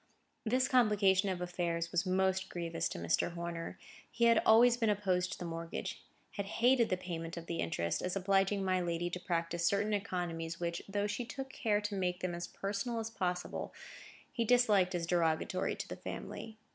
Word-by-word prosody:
This 255 +3 +3
complication 205 -5 +4
of 180 -2 -2
affairs 170 -1 -2
was 175 +2 0
most 190 0 +1
grievous 170 -1 -2
to - - -6
Mr. 85 - +1
Horner. 170 -1 -5 0.3
He 235 - +1
had 230 -1 +6
always 235 +2 +7
been 230 -2 +1
opposed 185 -3 +1
to - - -4
the 175 - -5
mortgage; 165 0 -5 0.4
had 200 -1 -2
hated 240 +2 +3
the 185 - +1
payment 170 -2 -5
of 170 - -6
the 170 -1 -3
interest, 85 0 -1
as 180 +1 -2
obliging 195 +1 +2
my 185 -1 +2
lady 175 0 -1
to 180 - -3
practise 170 -1 -1
certain 205 +4 +2
economies 175 -5 -2
which, 170 0 -2
though 205 +1 0
she 210 +4 -2
took 270 +3 -6
care 210 -2 +1
to 210 0 -3
make 180 -1 -1
them 185 -1 -1
as 175 0 -4
personal 205 +4 -3
as 225 0 -3
possible, 180 -4 -3 0.6
he 235 - +1
disliked 210 -6 +4
as 170 -1 -1
derogatory 165 -2 +1
to - - -5
the - - -5
family. 220 -1 -7
185 Hz, 185 wpm, -34 LUFS, 170-210 Hz, 0.6 s, always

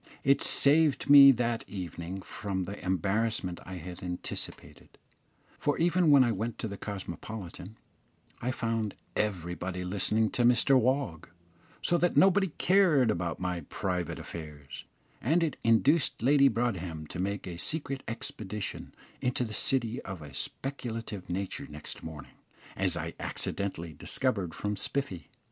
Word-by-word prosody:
It 140 +1 +4
saved 145 -1 +3
me 140 -1 +11
that 120 -1 -1
evening 90 0 -5
from 95 -3 -3
the 100 +3 -7
embarrassment 95 +1 0
I 95 - -6
had 90 +1 -8
anticipated; 90 -2 -5 0.6
for 145 - +1
even 170 0 +3
when 140 -2 +8
I 120 - +2
went 110 +2 -3
to - - -3
the 100 - -5
Cosmopolitan, 100 0 -7 0.7
I 125 - -1
found 115 -4 -1 0.2
everybody 90 -2 -2
listening 105 +4 +1
to - - -1
Mr 125 +3 +5
Wog, 130 - +1 0.5
so 175 - +3
that 175 - +2
nobody 195 +1 +5
cared 165 - +4
about 85 -3 -2
my 90 -2 -2
private 90 -3 -2
affairs, 75 -4 -8 0.4
and 165 +8 +3
it 155 -5 0
induced 125 +4 +3
Lady 140 +2 +6
Broadhem 95 -10 -1
to 75 - -7
make 100 +2 -2
a 85 -2 -6
secret 140 - -2
expedition 105 -2 -5 0.3
into 125 0 +1
the 110 -3 -5
City 120 0 0
of 90 -5 -7
a 70 -2 -10
speculative 115 - -5
nature 95 +2 -3
next 75 0 -8
morning, 75 -4 -9 0.4
as - - +1
I - - -4
accidentally 85 -5 -4
discovered 100 - -1
from 105 0 -2
Spiffy. 95 - -3
105 Hz, 140 wpm, -30 LUFS, 90-130 Hz, 0.7 s, me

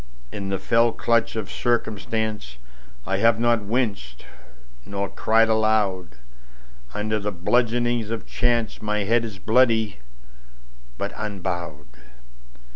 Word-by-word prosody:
In 100 -1 -5
the 95 - 0
fell 115 +3 +3
clutch 115 -1 +1
of 110 -4 -3
circumstanceI 110 - -2 0.6
have 115 +1 +4
not 120 -1 +3
winced 100 - -2 0.6
nor 100 0 -3
cried 115 +1 +3
aloud. 105 -6 +1 0.8
Under 110 +1 -1
the 105 +1 -2
bludgeonings 120 +4 +1
of 115 -1 -4
chanceMy 110 -3 0
head 115 +3 +3
is 110 -4 -6
bloody, 110 - +2 1.0
but 100 - -3
unbowed. 85 - -5
110 Hz, 105 wpm, -24 LUFS, 100-115 Hz, 1.0 s, have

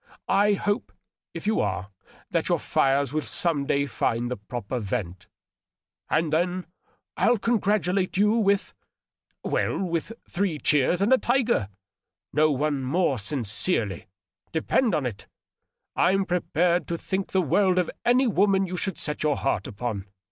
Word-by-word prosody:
I 205 +1 +4
hope, 205 +3 -1 0.4
if - - -8
you 215 +1 +1
are, 95 -1 -2 0.4
that - - 0
your - - +3
fires 140 0 +1
will 155 - 0
some 150 -3 -1
day 140 0 +1
find 120 -2 -1
the - - -1
proper 120 +3 -5
vent. 95 -5 -4 0.8
And 155 -1 +1
then 180 +3 0 0.5
I'll 240 - +3
congratulate 200 -5 0
you 210 +1 +4
with.. 200 -3 +1 0.7
well, - - 0
with 170 0 -2 0.2
three 185 -4 -1
cheers 150 +6 +2
and 225 +6 +4
a - - +7
^ - - -11
tiger 240 - +1 0.2
' 100 - -64
— - - -25
^no 155 +1 +4
one 145 -1 0
more 135 0 +1
sincerely, 110 - -1 0.4
depend 185 +6 +1
on 145 - -1
it. 115 -5 -5 0.7
I'm 195 +1 +3
prepared 175 0 +1
to 170 - -2
think 190 +3 -3
the 190 - +2
world 185 +3 +2
of 180 -2 +1
any 250 +2 +4
woman 195 -3 +3
you 180 0 -5
should 190 -1 -2
set 150 0 -1
your 150 -2 +1
heart 105 -8 -1
upon. 105 -2 -4
165 Hz, 155 wpm, -25 LUFS, 130-195 Hz, 0.8 s, a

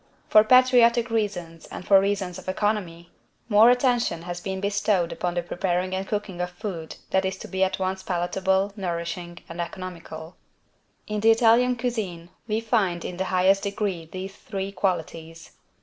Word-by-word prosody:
For 215 - +7
patriotic 245 -1 +5
reasons 180 -7 -3
and - - -8
for 195 -1 +7
reasons 195 -2 -2
of 185 - -7
economy, 185 -4 -2 0.4
more 215 +2 +7
attention 245 -9 +2
has 175 0 -6
been 190 0 -4
bestowed 200 -3 0
upon 175 -1 -3
the 175 - -1
preparing 180 +1 -1
and 190 +1 -3
cooking 205 -4 -3
of 180 - -2
food 180 -4 -6 0.2
that 190 - +2
is 190 0 -2
to - - -9
be 190 0 0
at 190 - 0
once 190 0 -2
palatable, 190 +2 0
nourishing 175 -2 -4
and 170 +1 -5
economical. 170 -2 -8 0.7
In 210 0 -3
the 220 +2 +4
Italian 235 +2 +4
=cuisine= 210 -9 -4 0.2
we 220 0 0
find 205 -7 0
in 180 - -5
the 190 - -1
highest 190 +1 +3
degree 200 -5 -3
these 190 +1 -6
three 195 -2 -5
qualities. 165 -3 -3
190 Hz, 165 wpm, -25 LUFS, 175-210 Hz, 0.7 s, For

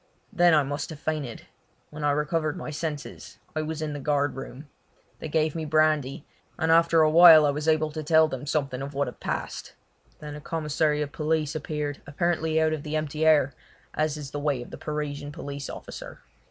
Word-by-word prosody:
Then 175 -2 +5
I 150 - +4
must 145 +2 -4
have 160 - -7
fainted. 150 -7 -4 0.5
When 150 0 -7
I 145 - +3
recovered 150 +1 0
my - - -6
senses 150 -1 -6 0.2
I 155 - 0
was 155 0 -4
in 150 -1 -3
the 145 - -5
guard 145 +1 0
room. 135 +2 -8 0.5
They - - -5
gave 155 0 +1
me 165 - -4
brandy, 155 -3 +1 0.3
and 160 0 +1
after 165 0 +5
a 155 - +4
while 165 -2 +9
I 145 - +3
was 150 +2 -4
able 155 -1 +2
to 155 +1 -5
tell 160 +1 +4
them 135 -1 -6
something 135 -3 -1
of 140 +1 -6
what 140 -1 0
had 125 - -8
passed. - - -4 0.4
Then 150 -1 -8
a 150 - -9
commissary 150 -1 0
of 145 - -7
police 155 -1 -1
appeared, 150 -1 -4
apparently 160 +1 0
out 160 0 +2
of 155 - -3
the 150 +1 -4
empty 155 0 -1
air, 145 -4 +4 0.4
as 155 -1 0
is 145 -2 -7
the 145 - -4
way 145 -4 -1
of - - -14
the - - -7
Parisian 145 -1 -4
police 140 -1 -6
officer. - - -9
150 Hz, 205 wpm, -26 LUFS, 145-155 Hz, 0.5 s, while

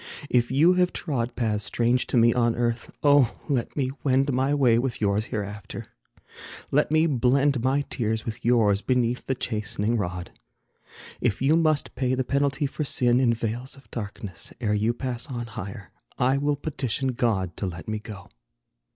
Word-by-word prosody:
If 120 -1 +3
you 155 +7 +5
have 180 0 +2
trod 125 -7 -2
Paths 105 -3 0
strange 120 +3 +1
to - - 0
me 115 0 +5
on 120 -2 +2
earth, 120 0 -1
oh, 145 -5 +4
let 135 -3 -1
me 130 -2 0
wend 135 0 +2
My 130 +2 +1
way 125 -5 +4
with 125 -1 -2
yours 105 0 +1
hereafter: 105 -3 -5 0.9
let 150 +2 +3
me 155 +1 +3
blend 135 -1 +2
My 135 +2 +2
tears 110 -2 -2
with 110 -1 -5
yours 110 -4 +3
beneath 125 -1 0
the 135 - 0
chastening 110 -1 -1
rod. 90 -3 -4 0.9
If 120 -5 0
you 140 +5 +3
must 155 -3 +1
pay 130 0 0
the 130 - 0
penalty 140 +1 0
for 140 +2 -3
sin, 125 -3 +3
In 125 -3 +3
vales 120 +4 -4
of 135 - -19
darkness, 100 -4 -6
ere 110 -4 0
you 105 +2 +2
pass 125 -2 -3
on 120 -3 -4
higher, 100 -4 -8 0.3
I 130 +2 +2
will 145 +1 +1
petition 135 -3 -2
God 110 -8 0
to 100 - -2
let 85 -1 -7
me 110 0 -2
go. 100 -2 -10
120 Hz, 175 wpm, -25 LUFS, 110-135 Hz, 0.9 s, you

